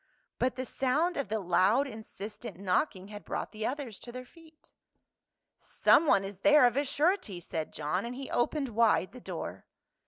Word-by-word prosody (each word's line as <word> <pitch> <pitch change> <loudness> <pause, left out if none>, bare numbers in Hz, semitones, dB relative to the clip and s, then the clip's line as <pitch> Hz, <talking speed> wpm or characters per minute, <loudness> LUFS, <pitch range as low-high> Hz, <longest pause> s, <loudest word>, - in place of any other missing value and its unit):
But 255 - +1
the 255 - -4
sound 300 +9 0
of 280 - -2
the 220 +1 0
loud 195 +8 +3
insistent 220 -3 -8
knocking 190 +1 -1
had 210 -1 -9
brought - - -4
the 215 0 -3
others 260 -6 -5
to 240 - -9
their 255 +1 -8
feet. 320 +2 -20 0.9
260 - - -17
PAUL. - - +7
"Someone 285 -11 +5
is 195 -1 -7
there 295 +2 +6
of 245 -1 +3
a 285 +1 +1
surety," 290 - 0
said 165 -2 -5
John, 155 +5 -2
and 240 +1 -5
he 270 0 -7
opened 275 +3 0
wide 225 -4 +2
the 250 - -12
door. 165 - -6
235 Hz, 185 wpm, -30 LUFS, 195-280 Hz, 0.9 s, PAUL